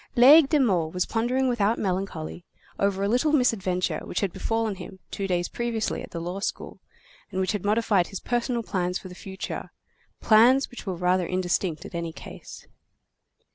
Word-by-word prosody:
Laigle 275 +4 +8
de 305 - +3
Meaux 185 - +2
was 180 +3 -1
pondering 250 +3 0
without 230 -2 +1
melancholy, 180 -4 -3 0.4
over 200 -1 +1
a - - +2
little 250 +8 +2
misadventure 185 - +1
which - - -3
had 195 -4 -1
befallen 225 +2 -1
him 190 0 -10
two 200 -2 -3
days 175 -2 0
previously 235 -2 -2
at - - -9
the 170 - -5
law 175 +3 -4
school, 200 - -4 0.5
and 190 -2 -4
which 185 -1 +1
had 205 -3 -3
modified 205 -3 +2
his 195 - -6
personal 240 -1 -1
plans 180 -3 -1
for 185 - -10
the - - -9
future, 190 +1 -6 0.5
plans 245 +6 +5
which 245 - -10
were 185 - -2
rather 180 0 +1
indistinct 180 -2 -1
in - - -9
any 170 -1 -3
case. - - -11
195 Hz, 175 wpm, -26 LUFS, 180-235 Hz, 0.5 s, Laigle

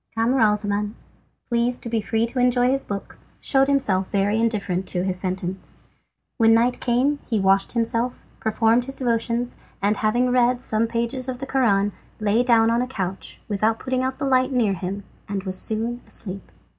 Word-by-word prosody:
Camaralzaman, 210 -3 +1 0.5
pleased 240 +1 0
to - - -4
be 225 -1 0
free 225 +2 0
to 245 +2 -4
enjoy 245 0 +3
his 270 0 0
books, 200 -1 -6
showed 270 -1 +3
himself 205 -10 +1
very 205 +2 +1
indifferent 200 -5 -1
to 180 -1 -1
his 190 -1 0
sentence. 185 0 -4 0.6
When 225 -1 +5
night 240 +2 +2
came 260 +4 +1
he 225 -3 +1
washed 195 0 +2
himself, 235 +1 -1
performed 225 +2 +2
his 270 +1 -3
devotions, 235 -1 -1 0.2
and, 205 +1 +1
having 240 +4 +1
read 250 0 +3
some 220 +1 0
pages 235 +3 -2
of 255 - -3
the 270 - -5
Koran, 205 -7 +2 0.3
lay 215 +2 +2
down 230 -2 +4
on 235 +1 +2
a 250 - -1
couch, 195 -7 -5
without 215 +2 +1
putting 255 +1 -2
out 260 0 -2
the 285 - -2
light 255 0 +2
near 235 -6 +2
him, 190 +2 -4 0.3
and 195 -1 -3
was 185 -1 0
soon 230 +3 0
asleep. 195 -2 -6
230 Hz, 175 wpm, -23 LUFS, 205-250 Hz, 0.6 s, When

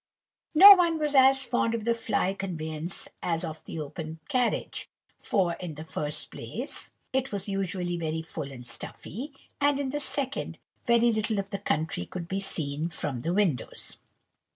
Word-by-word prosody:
No 395 +6 +13
one 345 -3 +3
was 300 -2 -1
as 270 0 +6
fond 235 -2 +1
of 220 -2 -4
the 235 - +3
fly 220 -4 0
conveyance 165 -3 -4
as 165 -1 -1
of 160 -2 -6
the 165 - -6
open 155 +2 -6
carriage; 250 -2 0 0.3
for, 180 -4 +1
in 175 -4 -6
the 155 - -7
first 150 -1 -2
place, - - -4 0.2
it 265 0 0
was 200 -1 -3
usually 185 -3 -2
very 160 -1 -2
full 140 -3 -6
and 125 -2 -10
stuffy; 225 - -5 0.3
and, 285 0 +3
in 270 -2 -1
the 295 - -2
second, 280 -1 -1 0.3
very 235 0 +4
little 215 0 0
of 195 0 -3
the 200 - -3
country 155 - -1
could 175 -2 -6
be 195 +2 -2
seen 155 -4 0
from 145 -5 -2
the 165 +8 -2
windows. 180 - -1
195 Hz, 170 wpm, -28 LUFS, 160-240 Hz, 0.3 s, No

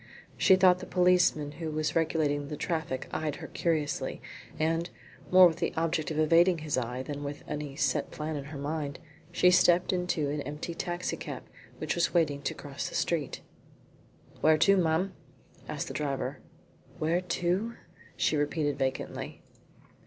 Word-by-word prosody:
She 190 - +6
thought 185 -1 +5
the 185 - -8
policeman 180 -5 +3
who 160 +1 -5
was 155 0 -1
regulating 155 -3 +1
the 150 - -5
traffic 160 -6 -2
eyed 155 -2 -2
her - - -8
curiously, 155 -3 -1 0.4
and, 165 +2 0 0.4
more 185 0 +9
with 165 -2 +3
the - - -2
object 160 -1 0
of 155 - -3
evading 170 +3 +5
his 150 - 0
eye 125 +1 -2
than 145 +1 -5
with 145 0 -6
any 150 -2 -4
set 140 -2 0
plan 155 +1 -4
in 140 -2 -5
her 145 0 -7
mind, 145 0 -3 0.3
she 180 +1 +5
stepped 180 0 +4
into 180 -4 0
an 150 0 -2
empty 150 +4 -5
taxi 175 +1 -3
cab - - -6 0.3
which - - -2
was 170 +1 0
waiting 150 -4 +2
to 140 - -3
cross 140 -1 -5
the - - -9
street. 160 -5 -1 1.0
"Where 155 0 +5
to, 195 +5 +5
ma'am?" 180 +1 +1 0.6
asked - - -3
the - - -6
driver. 140 -2 -2 0.6
"Where 165 +3 +1
to?" 180 +6 -1 0.4
she - - +2
repeated 145 -1 0
vacantly. 130 -1 -3
155 Hz, 160 wpm, -29 LUFS, 145-175 Hz, 1.0 s, more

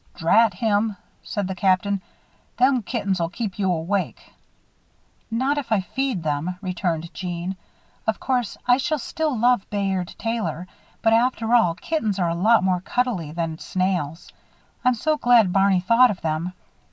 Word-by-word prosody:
"Drat 205 +4 +3
him," 210 0 0 0.2
said 205 -3 -3
the 190 - -3
Captain, 190 +1 +1 0.6
"them 255 0 +3
kittens'll 195 -7 -1
keep 205 0 -5
you 190 -2 +2
awake." 180 +4 -2 1.0
"Not 260 +6 0
if 255 -5 -8
I 215 -3 +3
feed 255 -2 -2
them," 155 +4 -2
returned 175 -3 -3
Jeanne. 180 0 -4 0.5
"Of 220 - 0
course 250 -4 -1
I 245 0 +5
shall 310 +3 0
still 300 0 -2
love 240 -2 +2
Bayard 195 -3 -2
Taylor, 225 -7 -3 0.4
but 225 - +4
after 230 -1 +2
all, 200 -9 +4
kittens 220 - -2
are 175 -3 +1
a - - 0
lot 215 +5 +4
more 185 -1 +1
cuddle 245 +2 0
y 160 -4 -7
than 165 -1 -3
snails. 180 -4 -2 0.5
I'm 250 -1 +3
so 310 +6 0
glad 240 -8 +4
Barney 195 -1 +3
thought 230 +6 +5
of 195 - -4
them. 160 +3 -2
200 Hz, 155 wpm, -23 LUFS, 180-235 Hz, 1.0 s, I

